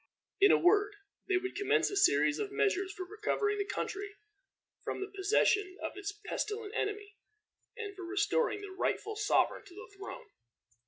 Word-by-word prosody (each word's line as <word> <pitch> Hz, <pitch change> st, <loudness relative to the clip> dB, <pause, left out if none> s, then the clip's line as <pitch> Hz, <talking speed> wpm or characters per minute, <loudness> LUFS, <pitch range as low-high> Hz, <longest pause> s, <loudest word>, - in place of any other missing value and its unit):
In 400 Hz, 0 st, +7 dB
a -, -, +6 dB
word, 410 Hz, +3 st, +3 dB, 0.3 s
they 370 Hz, -, +3 dB
would 375 Hz, +1 st, -3 dB
commence 405 Hz, +1 st, +2 dB
a -, -, -3 dB
series 150 Hz, -, +4 dB
of 405 Hz, -, -3 dB
measures 395 Hz, -2 st, +1 dB
for 370 Hz, 0 st, -6 dB
recovering 415 Hz, +1 st, -1 dB
the 400 Hz, -, 0 dB
country 405 Hz, 0 st, -4 dB, 0.7 s
from -, -, -3 dB
the 390 Hz, 0 st, -5 dB
possession 395 Hz, -1 st, +2 dB
of -, -, -3 dB
its 405 Hz, 0 st, -4 dB
pestilent 425 Hz, 0 st, -3 dB
enemy, 415 Hz, 0 st, -3 dB, 0.6 s
and 415 Hz, -3 st, -5 dB
for 385 Hz, -, -8 dB
restoring 410 Hz, +4 st, +1 dB
the 405 Hz, -1 st, -8 dB
rightful 425 Hz, +3 st, -2 dB
sovereign 420 Hz, -1 st, +2 dB
to 365 Hz, -3 st, -15 dB
the 420 Hz, 0 st, -11 dB
throne. 390 Hz, -1 st, -8 dB
405 Hz, 165 wpm, -32 LUFS, 385-415 Hz, 0.7 s, In